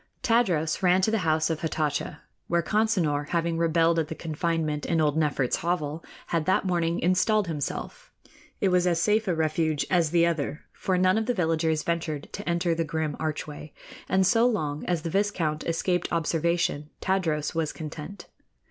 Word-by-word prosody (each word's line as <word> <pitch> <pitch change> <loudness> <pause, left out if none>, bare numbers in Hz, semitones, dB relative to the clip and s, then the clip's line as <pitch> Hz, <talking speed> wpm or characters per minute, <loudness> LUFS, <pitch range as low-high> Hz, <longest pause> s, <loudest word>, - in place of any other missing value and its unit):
Tadros 185 -11 +2
ran 180 0 +4
to 220 - +2
the 225 - +1
house 160 -2 +1
of 160 - -3
Hatatcha, 150 -2 -2 0.3
where 170 0 +1
Consinor, 180 -9 +1
having 165 0 0
rebelled 165 0 +3
at 160 - -1
the 160 - -6
confinement 160 -2 -2
in 165 - 0
old 150 -2 +2
Nefert's 145 -5 +1
hovel, 165 -2 -2 0.2
had 165 -1 -1
that 190 - +2
morning 170 -2 0
installed 190 +4 +2
himself. 155 -5 -5 0.5
It 195 - +2
was 180 0 +3
as 170 -2 +2
safe 215 +4 +2
a 180 - +1
refuge 155 -1 0
as 170 -4 +3
the 170 +1 +4
other, 155 -3 -2
for 185 -1 -1
none 185 +3 +3
of 220 - -3
the 245 - +1
villagers 160 -3 +1
ventured 165 -3 -3
to - - -5
enter 170 0 +1
the 165 0 0
grim 155 -1 -2
archway, 150 -1 -5 0.4
and 190 0 +3
so 230 +5 +4
long 155 -11 -2
as 175 -3 -1
the 165 - -3
viscount 175 -6 0
escaped 175 +1 0
observation 165 -2 0
Tadros 165 -6 0
was 160 -2 -1
content. 155 +4 -8
165 Hz, 175 wpm, -26 LUFS, 155-180 Hz, 0.5 s, ran